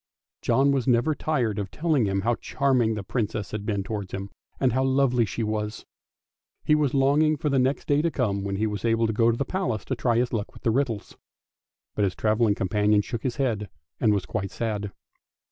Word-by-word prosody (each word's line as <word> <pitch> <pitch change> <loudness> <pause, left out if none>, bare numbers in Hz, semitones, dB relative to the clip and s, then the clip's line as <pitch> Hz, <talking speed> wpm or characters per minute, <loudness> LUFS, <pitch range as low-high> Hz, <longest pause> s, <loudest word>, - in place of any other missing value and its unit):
John 140 +1 +3
was 135 -4 0
never 125 +5 +3
tired 130 -9 -1
of 100 -2 -3
telling 150 - +1
him 95 0 0
how 120 +4 +1
charming 125 -2 +1
the 105 - -4
Princess 105 -2 -3
had 105 -1 -5
been 100 -3 0
towards 100 -2 -5
him, 95 +1 -6 0.3
and 130 -4 +2
how 130 +1 +2
lovely 130 -3 +3
she 115 +5 -3
was. 105 0 -3 0.8
He - - +3
was 150 -3 +2
longing 145 +3 +3
for 150 - -1
the 135 -1 +2
next 130 +2 0
day 145 0 +3
to 170 - +1
come, 100 -10 -1
when 100 0 -2
he 105 +3 0
was 105 -2 -3
to 115 -1 +2 0.2
go 115 +2 +3
to 115 - +1
the 140 - -1
Palace 180 - -2
to 130 - -2
try 120 -1 +1
his 120 0 0
luck 105 -3 -3
with - - -14
the 115 - +2
riddles. 120 -4 -2 0.8
But 105 - 0
his 90 -2 -2
travelling 110 -1 +2
companion 105 +2 +2
shook 115 +1 -5
his 125 -3 -2
head 115 -7 -1 0.3
and 110 - +3
was 100 -2 0
quite 100 -3 -3
sad. 105 -2 -3
115 Hz, 215 wpm, -25 LUFS, 105-135 Hz, 0.8 s, John